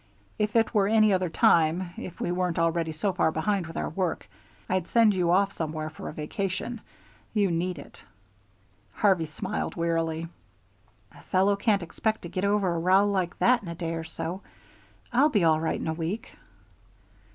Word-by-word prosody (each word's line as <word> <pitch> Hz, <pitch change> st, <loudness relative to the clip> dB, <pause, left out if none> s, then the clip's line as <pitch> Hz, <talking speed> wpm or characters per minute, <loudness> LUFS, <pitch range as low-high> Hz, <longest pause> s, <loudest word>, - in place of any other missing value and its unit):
If 210 Hz, +1 st, 0 dB
it 225 Hz, 0 st, +3 dB
were 200 Hz, -3 st, +3 dB
any 215 Hz, -1 st, +4 dB
other 185 Hz, -2 st, +1 dB
time, 170 Hz, +2 st, +3 dB
if 180 Hz, -, -8 dB
we 175 Hz, -, -1 dB
weren't 180 Hz, -1 st, -1 dB
already 165 Hz, -1 st, +1 dB
so 185 Hz, +5 st, -1 dB
far 170 Hz, -3 st, +2 dB
behind 175 Hz, +3 st, -1 dB
with 165 Hz, -, -8 dB
our -, -, -2 dB
work, 180 Hz, 0 st, -2 dB, 0.4 s
I'd 185 Hz, -1 st, -1 dB
send 230 Hz, -3 st, +4 dB
you 180 Hz, -3 st, +1 dB
off 195 Hz, +3 st, +3 dB
somewhere 155 Hz, -2 st, -4 dB
for -, -, -7 dB
a -, -, -5 dB
vacation. 195 Hz, +9 st, -4 dB, 0.5 s
You 200 Hz, -3 st, +2 dB
need 175 Hz, +1 st, -1 dB
it." 140 Hz, -, -12 dB, 0.9 s
Harvey 185 Hz, -6 st, +2 dB
smiled 190 Hz, +6 st, -4 dB
wearily. 165 Hz, -1 st, -1 dB, 0.8 s
"A -, -, -16 dB
fellow 195 Hz, +2 st, +3 dB
can't 200 Hz, -2 st, +1 dB
expect 215 Hz, +6 st, -2 dB
to 170 Hz, -, -6 dB
get 185 Hz, -, -3 dB
over 200 Hz, -3 st, +2 dB
a 170 Hz, -, -1 dB
row 190 Hz, +4 st, +4 dB
like 185 Hz, -3 st, -1 dB
that 245 Hz, 0 st, +4 dB
in 195 Hz, -, -10 dB
a 170 Hz, -, -5 dB
day 165 Hz, -1 st, -3 dB
or 165 Hz, 0 st, -4 dB
so. 165 Hz, +3 st, -5 dB, 0.7 s
I'll 275 Hz, +5 st, +5 dB
be 210 Hz, -, +2 dB
all 160 Hz, -1 st, +4 dB
right 160 Hz, -, -1 dB
in -, -, -4 dB
a 160 Hz, -, 0 dB
week." 170 Hz, +7 st, -4 dB
180 Hz, 185 wpm, -27 LUFS, 165-200 Hz, 0.9 s, I'll